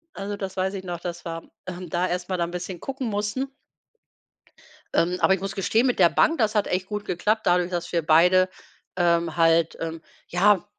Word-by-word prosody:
Also, 200 +1 -4
das 195 -1 -6
weiß 190 +1 0
ich 190 -1 -5
noch, 175 -2 -5
dass 175 0 -6
wir, 165 -1 -6 0.2
ähm, 180 -1 -6
da 175 +3 0
erstmal 180 +1 -2
da 170 - 0
'n 170 - -7
bisschen 180 0 -5
gucken 265 +2 -4
mussten. 210 +6 -2 1.4
Ähm, 180 +2 +2
aber 190 - +4
ich 190 - -2
muss 195 0 -4
gestehen, 220 +5 +2
mit 245 - 0
der 170 -2 +7
Bank, 325 0 +3
das 220 -1 +1
hat 210 - +2
echt 185 +1 -1
gut 210 -1 -4
geklappt, 210 +5 0
dadurch, 180 0 +3
dass 175 -1 -3
wir 170 - +1
beide, 180 +4 +5 0.5
ähm, 170 -2 +1
halt, 165 0 +3
ähm, 165 0 -4 0.3
ja 190 +2 +3
180 Hz, 200 wpm, -25 LUFS, 175-200 Hz, 1.4 s, der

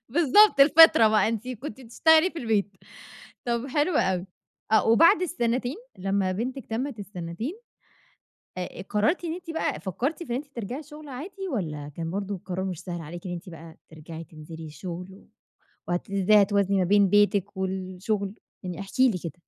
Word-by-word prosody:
بالضبط 335 - +5
الفِطرة 285 -5 +8
بقى، 215 0 +3
أنتِ 230 +2 -3
كنتِ 255 0 -7
بتشتغلي 315 +8 +4
في 335 - -8
البيت، 215 -6 0 0.7
طَب 235 +1 -1
حلو 295 +4 0
أوي، 185 0 +1 0.5
آه 220 - +4
وبعد 325 +9 +6
السنتين 250 -4 -1 0.2
لمّا 195 0 0
بنتِك 255 +6 -4
تمِّت 240 +1 -3
السنتين، 190 - -5 1.1
آآ 180 0 -6
قرّرتِ 210 - 0
إن 330 -1 -2
أنتِ 355 -2 -9
بقى 325 -3 -2
فكّرتِ 260 - -3
في 330 - -10
إن 240 - 0
أنتِ 285 +3 -5
ترجعي 250 +2 -6
شغل 300 +1 -12
عادي، 370 +9 -7
والّا 155 - -3
كان 165 -1 -4
برضه 200 +2 -3
القرار 185 0 -5
مش 185 -4 -4
سهل 175 -2 -6
عليكِ 170 +3 -8
إن 175 - -4
أنتِ 175 +2 -7
بقى 165 -1 -11
ترجعي 160 +1 -10
تنزلي 160 +1 -10
الشغل، 175 +4 -7
و 195 - -18 0.6
وهت 175 +2 -2
إزاي 200 +2 +5
هتوازني 200 -1 +2
ما 185 - +3
بين 200 +1 +4
بيتِك 205 -1 +2
والشغل؟ 190 +2 -3 0.3
يعني 180 -1 -5
احكي 255 +6 +2
لي 190 - -3
كده. 165 -3 -6
205 Hz, 170 wpm, -26 LUFS, 185-265 Hz, 1.1 s, الفِطرة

